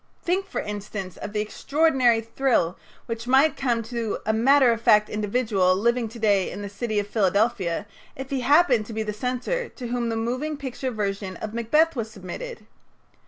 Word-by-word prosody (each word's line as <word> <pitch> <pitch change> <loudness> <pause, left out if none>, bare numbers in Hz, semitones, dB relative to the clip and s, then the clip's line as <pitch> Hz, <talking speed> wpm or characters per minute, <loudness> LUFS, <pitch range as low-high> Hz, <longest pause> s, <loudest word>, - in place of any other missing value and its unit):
Think, 375 +3 0
for - - -4
instance, 205 -3 -6
of 205 - -6
the 210 0 -1
extraordinary 260 0 +2
thrill 230 -6 +1 0.3
which 230 +1 -5
might 270 +5 +4
come 240 -4 0
to 230 -1 -3
a 220 - +1
matter 260 +3 +5
of 230 -1 -2
fact 210 -1 +5
individual 210 -3 +1
living 235 +3 +1
to 230 - -11
day 205 -4 +2
in 205 - -7
the 200 - -5
city 215 +2 -3
of 205 - +1
Philadelphia 200 -3 +1 0.3
if 265 +1 -8
he 270 - 0
happened 255 -5 +4
to 230 - -7
be 220 0 -2
the 210 -1 -3
censor 255 - -2
to 245 - -8
whom 240 -1 -1
the 225 - -1
moving 255 +7 -2
picture 265 -1 -4
version 200 -4 -3
of 215 0 -6
"Macbeth" 300 +8 +2
was 225 -3 -3
submitted. 215 - -8
230 Hz, 185 wpm, -24 LUFS, 210-260 Hz, 0.3 s, matter